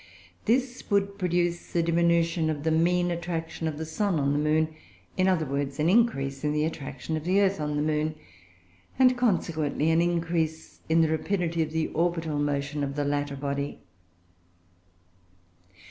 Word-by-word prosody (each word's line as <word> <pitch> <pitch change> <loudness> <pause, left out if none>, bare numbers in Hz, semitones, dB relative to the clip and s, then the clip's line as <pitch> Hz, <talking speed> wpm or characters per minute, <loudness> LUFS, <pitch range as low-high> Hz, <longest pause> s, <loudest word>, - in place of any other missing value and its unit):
This 255 +2 0
would 200 -1 +1
produce 175 -2 -1
a 170 - +3
diminution 170 -1 +2
of 145 -2 -3
the 160 - +1
mean 175 +2 +2
attraction 165 -1 -3
of 155 -2 -3
the 160 - -4
sun 185 +1 0
on 140 0 +1
the 145 - +1
moon; 155 +1 +2
or, - - -18 0.4
in 185 0 +2
other 180 -4 +2
words, 140 0 -3
an 155 +3 +3
increase 140 - +2
in 150 0 +1
the 150 0 +1
attraction 145 -1 -4
of 155 - -3
the 185 +4 +2
earth 195 -4 +2
on 150 0 -2
the 150 - 0
moon; 155 0 0 0.8
and, 255 -1 +5
consequently, 165 - +1
an 165 +1 +4
increase 165 -2 -1
in 165 +1 +4
the 160 - +4
rapidity 170 +1 0
of 155 - 0
the 160 0 0
orbital 165 -3 -1
motion 145 0 -1
of 140 0 -3
the 145 -1 -1
latter 145 0 -1
body. 140 0 -3
160 Hz, 170 wpm, -27 LUFS, 150-175 Hz, 0.8 s, and